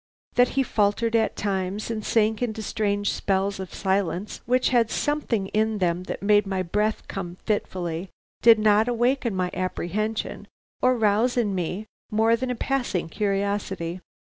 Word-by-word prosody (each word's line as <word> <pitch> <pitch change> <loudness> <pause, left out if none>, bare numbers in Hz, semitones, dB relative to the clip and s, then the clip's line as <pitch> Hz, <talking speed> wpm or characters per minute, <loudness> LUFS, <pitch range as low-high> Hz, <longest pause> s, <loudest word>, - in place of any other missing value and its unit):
That 245 0 +5
he 270 - +5
faltered 225 0 +1
at 225 - +2
times 195 +2 -2
and 215 -2 -3
sank 220 0 +2
into 220 -2 -2
strange 205 -1 0
spells 195 0 0
of 190 -2 -6
silence 190 0 -1
which 255 +1 +3
had 235 -3 +3
something 240 -11 -1
in 220 0 +1
them 180 -1 0
that - - -5
made 205 0 +4
my 190 -1 -1
breath 210 +5 -1
come 175 -3 -5
fitfully, 180 -4 -2 0.3
did 230 -1 +8
not 215 +1 +4
awaken 240 -1 +1
my 180 -1 -1
apprehension 190 +4 -3 0.3
or 255 0 +3
rouse 225 +3 +2
in 215 -5 +1
me 180 +3 -3 0.2
more 225 +1 +3
than 255 +2 -3
a 250 - -1
passing 245 -10 -1
curiosity. 195 -3 -2
210 Hz, 155 wpm, -25 LUFS, 190-230 Hz, 0.3 s, did